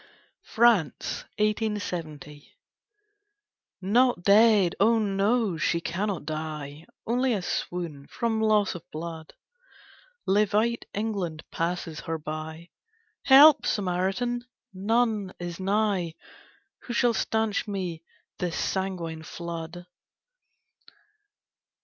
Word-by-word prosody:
FRANCE. 220 - +2
1870. 180 -9 -3 1.3
Not 235 +1 +2
dead, 205 -3 +5
oh 225 +3 +4
no, 205 -1 +1
she 170 +2 +1
cannot 180 0 -3
die! 155 -1 -5 0.2
Only 250 +2 +1
a 195 -4 -2
swoon, 170 -6 -4
from 225 -2 -1
loss 215 -2 +3
of 175 - -7
blood! 160 0 -7 0.9
Levite 210 +4 +2
England 195 -7 -3
passes 165 -2 -3
her 165 0 -3
by, 155 +2 -7 0.5
Help, 285 +2 +8
Samaritan! 195 +6 -1 0.3
None 210 0 0
is 175 0 -6
nigh; 195 -4 0 0.7
Who 240 - -4
shall 235 0 +3
stanch 220 -1 0
me 185 -5 -4 0.4
this 175 -2 -2
sanguine 180 -4 -2
flood? 170 +1 -7
190 Hz, 90 wpm, -27 LUFS, 165-220 Hz, 1.3 s, Help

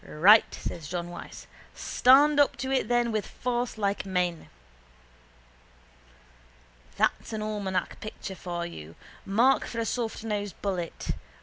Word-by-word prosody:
—Right, 200 +8 +5
says 165 -3 -6
John 175 +1 -4
Wyse. 175 - -9 0.3
Stand 285 +3 +5
up 285 - +4
to 260 +2 -3
it 265 -5 +1
then 240 0 +2
with 215 -2 -2
force 245 -1 -3
like 200 -1 -1
men. 180 -3 -2 2.5
That's - - 0
an 215 -1 -3
almanac 200 -4 -2
picture 215 -2 -7
for 175 -2 -4
you. 80 - -9 0.3
Mark 235 +7 +3
for 235 - -7
a 230 - 0
softnosed 215 -5 -3
bullet. 180 -4 -3
210 Hz, 125 wpm, -27 LUFS, 180-240 Hz, 2.5 s, Right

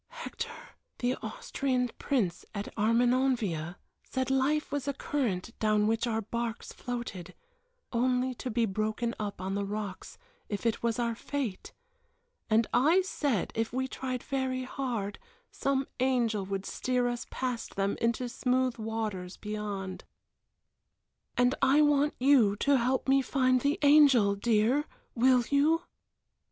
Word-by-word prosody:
"Hector 485 0 -6 0.5
the 245 +1 0
Austrian 265 - -2
Prince 205 -12 0
at 200 0 -5
Armenonville 230 -7 +1 0.3
said 260 0 -2
life 280 +3 +1
was 285 -1 -2
a 280 - 0
current 230 -10 -2
down 215 -1 +3
which 225 +2 +1
our 225 -1 -1
barks 235 +2 -4
floated, 215 -8 -6 0.6
only 250 +1 +1
to 250 - -5
be 235 0 +1
broken 215 +3 -1
up 205 -3 -4
on 190 +1 -3
the 200 0 -1
rocks 200 -1 -5 0.3
if 205 +1 -4
it 230 -1 +1
was 230 -1 0
our 235 -1 0
fate; 235 -4 -4 0.8
and 220 +1 +4
I 315 +10 +4
said 285 - -1
if 225 0 -1
we 260 +2 -1
tried 255 -1 -4
very 260 -2 -1
hard 240 -6 -3 0.3
some 275 0 0
angel 235 -6 +1
would 195 0 -3
steer 250 -1 0
us 240 0 -3
past 250 -3 -4
them 200 0 0
into 235 +2 +1
smooth 250 0 0
waters 215 -5 -4
beyond; 205 -3 -5 1.3
and 245 +1 +4
I 285 +3 +5
want 295 0 +3
you 250 -6 +5
to 280 +6 +3
help 255 +3 0
me 270 +1 +5
to - - -9
find 255 -2 +3
the 285 +3 +1
angel, 280 -8 +6
dear 230 +7 +2 0.3
will 250 +1 +4
you?" 310 +4 +3
240 Hz, 140 wpm, -30 LUFS, 215-265 Hz, 1.3 s, angel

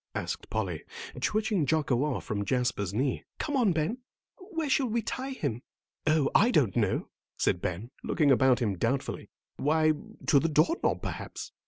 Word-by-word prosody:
asked - - -4
Polly, - - -2 0.4
twitching 215 -5 +1
Jocko 140 -4 +2
off 150 -3 -1
from 100 -1 -2
Jasper's 125 -5 0
knee. 125 +6 -1
"Come 295 - -2
on, 240 -7 +4
Ben, 165 +9 -1 0.5
where 325 -5 -2
shall 270 -1 +2
we 230 0 -1
tie 260 +4 -3
him?" 140 - -3 0.5
"Oh, 155 -3 +3
I 225 - +5
don't 135 - +2
know," - - 0 0.3
said 90 - +1
Ben, 100 +8 -3
looking 150 -4 +2
about 130 -1 +4
him 100 -5 -1
doubtfully. 130 +6 -1 0.3
"Why, 155 +2 +3 0.3
to 140 - +5
the 165 - 0
door 155 - +3
knob, - - 0
perhaps." - - -5
150 Hz, 165 wpm, -29 LUFS, -, 0.5 s, I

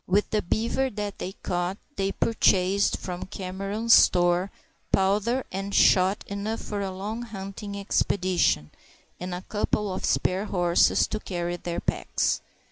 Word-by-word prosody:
With 200 +3 +1
the 215 - +2
beaver 235 +8 0
that 205 -3 -5
they 185 - -4
caught 175 +2 -1 0.2
they 195 0 0
purchased 195 -2 +2
from 180 0 -6
Cameron's 195 +4 -1
store 175 +1 +5 0.4
powder 210 +7 +2
and 195 +1 -4
shot 190 +2 +4
enough 205 +3 -4
for 205 -1 -4
a 195 - -2
long 205 +5 -5
hunting 200 -2 -7
expedition, 180 - +1 0.5
and 180 0 -4
a 180 - -7
couple 210 -1 -1
of 185 - -5
spare 190 +3 +1
horses 175 -4 +3
to 215 - -4
carry 175 -3 -3
their 175 -1 -4
packs. - - -1
195 Hz, 140 wpm, -26 LUFS, 180-210 Hz, 0.5 s, store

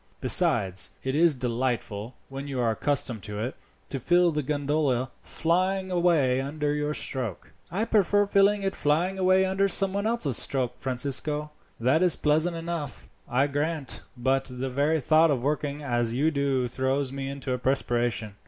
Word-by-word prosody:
Besides, 95 -1 +2
it 130 +1 -2
is 165 -1 +4
delightful, 120 -3 -3
when 135 +1 -7
you 135 -2 -4
are 115 -2 +2
accustomed 125 -2 0
to 105 0 -6
it, 120 +5 -3 0.3
to 135 - -3
feel 175 +5 +3
the 150 -1 -1
gondola 145 -3 -1
flying 185 +3 0
away 160 -8 +2
under 145 +1 -2
your 150 0 -1
stroke." 120 - -4 0.2
"I 200 +6 -1
prefer 205 -2 +3
feeling 200 0 +3
it 195 - -1
fly 155 +5 +1
away 190 0 +2
under 190 +1 +1
some 195 0 +1
one 200 +2 -1
else's 195 - 0
stroke, 130 -3 0
Francisco. 145 +4 -2 0.3
That 130 +8 +2
is 180 -3 +6
pleasant 160 +3 +2
enough, 165 -4 -5 0.2
I 130 +3 +2
grant; 145 +1 -2 0.2
but 135 +2 +1
the 125 +1 -4
very 145 +5 +1
thought 155 +4 +4
of 130 -5 0
working 145 0 -2
as 120 -3 0
you 150 +5 +2
do 140 -3 0
throws 130 +2 -1
me 135 0 -4
into 140 -1 -4
a 125 - -2
perspiration. 120 -5 -1
145 Hz, 165 wpm, -26 LUFS, 130-165 Hz, 0.3 s, is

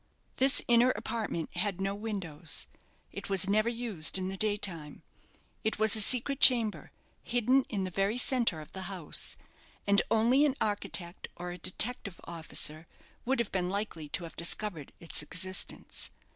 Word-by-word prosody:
This 270 +1 +3
inner 240 +1 +5
apartment 220 -7 -4
had 200 -3 -1
no 195 +1 -1
windows. 190 -7 -1 0.5
It - - -8
was 195 -1 +6
never 215 +3 +2
used 225 -9 0
in 185 0 -2
the 195 - -5
day 205 +1 +1
time. 165 -8 -5 0.6
It 220 - -1
was 220 0 +5
a 215 - +5
secret 255 +5 +5
chamber, 230 -5 +4 0.3
hidden 245 +3 +1
in 200 -4 -2
the 185 - -4
very 195 +5 -1
centre 240 -10 +2
of 150 - -14
the 190 0 -7
house; 180 -6 0 0.5
and 200 0 +4
only 235 +5 +3
an 285 -3 +2
architect 190 -4 -4
or 175 0 -6
a 180 - -9
detective 200 +1 +2
officer 160 -1 0 0.4
would 265 +2 +1
have 235 -3 -2
been 180 -2 -1
likely 190 -6 -4
to 175 - -3
have 165 - -10
discovered 170 -2 -3
its 165 - -3
existence. 185 +5 -5
200 Hz, 160 wpm, -30 LUFS, 175-230 Hz, 0.6 s, was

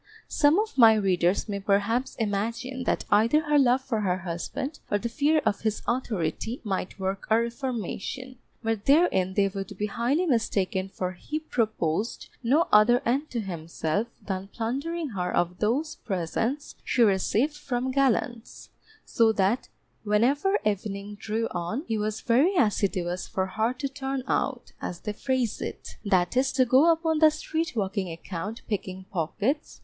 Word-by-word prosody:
Some 295 +3 +4
of 435 -8 -2
my 225 -2 +8
readers 190 -2 +1
may 200 -1 -3
perhaps 205 +5 +1
imagine 230 +5 -2
that - - 0
either 225 +9 +4
her 295 -2 +3
love 260 -1 +4
for 235 -4 -2
her 185 -3 +1
husband, 180 - -4
or 205 - +2
the 235 +3 -3
fear 300 +5 +2
of 200 - +1
his 220 -1 -1
authority, 225 - -2
might 190 -3 -3
work 190 +1 -3
a 220 +1 +5
reformation, 250 +1 -4 0.3
but 225 -2 -1
therein 275 - +3
they 200 -1 +4
would 195 0 -6
be 210 - -1
highly 245 - 0
mistaken 200 - 0
for 185 -1 -3
he 295 - -5
proposed 220 - -1
no 280 +8 +3
other 240 +5 +6
end 275 +6 0
to 235 - -2
himself 170 +2 -2 0.2
than 190 -1 -3
plundering 280 +10 -3
her 180 -5 -2
of 175 +1 0
those 280 +9 0
presents 225 - -2
she 245 - +3
received 220 +8 +2
from 260 -3 -2
gallants, 255 -3 0 0.4
so 225 -1 +3
that 205 +4 +1 0.3
whenever 265 - +2
evening 205 0 -2
drew 220 +2 -2
on, 175 - -3
he 225 -2 -1
was 215 +1 -2
very 275 +12 +3
assiduous 185 - +1
for 190 - -1
her 220 +5 0
to 260 +2 -3
turn 270 -1 -4
out 255 -3 -1
(as 175 - -5
they 210 - -3
phrase 260 -1 -1
it), - - -6
that 185 -2 +2
is 265 +1 +3
to 260 -1 +3
go 265 +7 +5
upon 325 -1 +1
the 315 0 +8
street 315 +1 -3
walking 195 -3 -1
account 180 +6 -6
picking 190 -3 -4
pockets. 210 - -2
225 Hz, 160 wpm, -27 LUFS, 195-265 Hz, 0.4 s, my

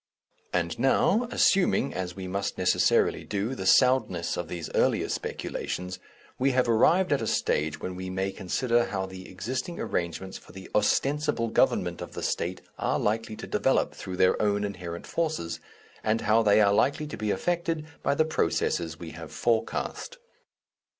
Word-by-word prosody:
And 85 +1 -1
now, 195 - +3
assuming, 185 - +3
as 90 -2 -4
we 95 -1 -6
must 100 +2 -2
necessarily - - +2
do, 105 +5 -2
the 95 -7 -4
soundness 125 -9 +3
of 90 - -4
these 85 -2 -5
earlier - - +2
speculations, 90 0 -4 0.4
we 135 +1 +2
have 125 -1 +2
arrived 165 +11 +4
at 140 - +1
a 110 - -2
stage 75 -5 0
when 90 - -5
we 95 0 -5
may 95 +1 -1
consider 120 +6 +1
how 95 -1 -3
the 95 0 -10
existing 130 - -4
arrangements 90 +2 -3
for - - -17
the 95 0 -11
ostensible 140 +2 +1
government - - +1
of - - -7
the - - -5
State 90 +2 -2 0.2
are - - +1
likely 110 +1 -1
to - - -7
develop - - +1
through 90 -1 -7
their 90 - +3
own 105 -1 +1
inherent 90 -4 -5
forces, 150 - -2 0.4
and 110 +1 +1
how 110 +2 +4
they 105 -1 +5
are 100 -1 +4
likely 140 +7 +2
to 150 - -6
be 110 -1 -3
affected 165 - -1 0.2
by 140 - +1
the 155 - +3
processes 440 - 0
we - - -8
have - - -9
forecast. - - -1
105 Hz, 165 wpm, -27 LUFS, 95-135 Hz, 0.4 s, they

